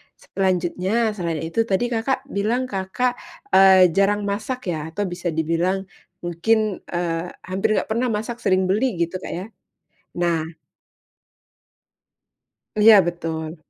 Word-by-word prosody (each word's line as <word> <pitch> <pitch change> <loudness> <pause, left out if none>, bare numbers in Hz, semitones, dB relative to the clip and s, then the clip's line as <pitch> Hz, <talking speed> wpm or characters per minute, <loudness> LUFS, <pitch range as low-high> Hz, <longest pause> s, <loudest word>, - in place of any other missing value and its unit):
selanjutnya, 190 - 0
selain 170 -6 -3
itu 225 +8 -1
tadi, 240 +6 0
Kakak, 255 +4 -1
bilang, 235 +5 -1
Kakak, 200 +6 -1 0.3
eee, 190 -2 +7
jarang 200 +3 +2
masak, 215 +6 -3
ya, 155 0 -4
atau 205 - 0
bisa 175 0 -5
dibilang 165 +4 0 0.4
mungkin, 210 +4 0
eee, 170 -1 -2 0.2
hampir 190 +4 0
enggak - - -1
pernah 240 +2 +1
masak 225 +2 -3
sering 185 -1 +2
beli 215 +1 +1
gitu, 170 +2 -2
Kak, - - -7
ya. 185 - -5 0.8
Nah 165 -2 +1 2.3
Iya, 215 0 +8
betul. 165 -1 -4
190 Hz, 125 wpm, -22 LUFS, 175-220 Hz, 2.3 s, Iya